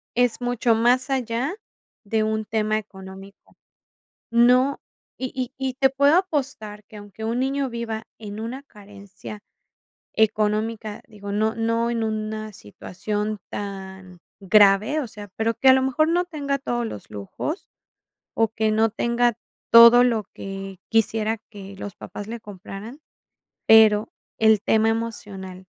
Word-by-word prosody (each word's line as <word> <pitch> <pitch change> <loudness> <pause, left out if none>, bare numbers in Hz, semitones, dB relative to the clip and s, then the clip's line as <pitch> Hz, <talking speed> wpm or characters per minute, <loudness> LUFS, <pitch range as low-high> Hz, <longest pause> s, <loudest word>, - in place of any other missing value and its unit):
es 245 -1 +1
mucho 245 -1 +1
más 250 +4 +2
allá 255 - -1 0.5
de 220 +2 0
un 220 0 -1
tema 215 0 0
económico. 195 -1 -11 0.7
No. 250 +4 +4 0.4
Y 260 -1 -4
y 255 -1 -3
y 265 -1 -2
te 270 0 +3
puedo 280 +4 +4
apostar 265 - -2
que 215 - -13
aunque 205 +1 -9
un 230 +2 -1
niño 270 +1 -1
viva 230 -2 -4 0.2
en 210 -1 -7
una 235 +5 -5
carencia 205 -2 -12 0.7
económica, 215 0 0
digo, 205 -2 -8
no 220 +2 +1
no 230 +1 0
en 230 -1 -1
una 215 0 -4
situación 205 - -5
tan 190 -2 -7 0.2
grave, 205 +7 +4
o 270 - -4
sea, 205 -1 -10
pero 225 +1 0
que 265 - +3
a - - +10
lo 265 - +4
mejor 280 +4 +1
no 350 +2 +2
tenga 280 -4 -2
todos 240 -3 -2
los 105 - -8
lujos 105 - -5 0.7
o 225 -1 +2
que 220 -1 0
no 220 +1 +3
tenga 235 +1 +1 0.4
todo 235 +1 +9
lo 230 -4 +1
que 195 -1 -7
quisiera 225 0 +1
que 200 -2 -10
los 200 -1 -7
papás 205 - -8
le 235 +1 -5
compraran. 205 - -10 0.7
Pero, 220 -1 +6 0.3
el 220 -2 +5
tema 220 0 +3
emocional, 200 -5 -5
220 Hz, 140 wpm, -23 LUFS, 205-245 Hz, 0.7 s, a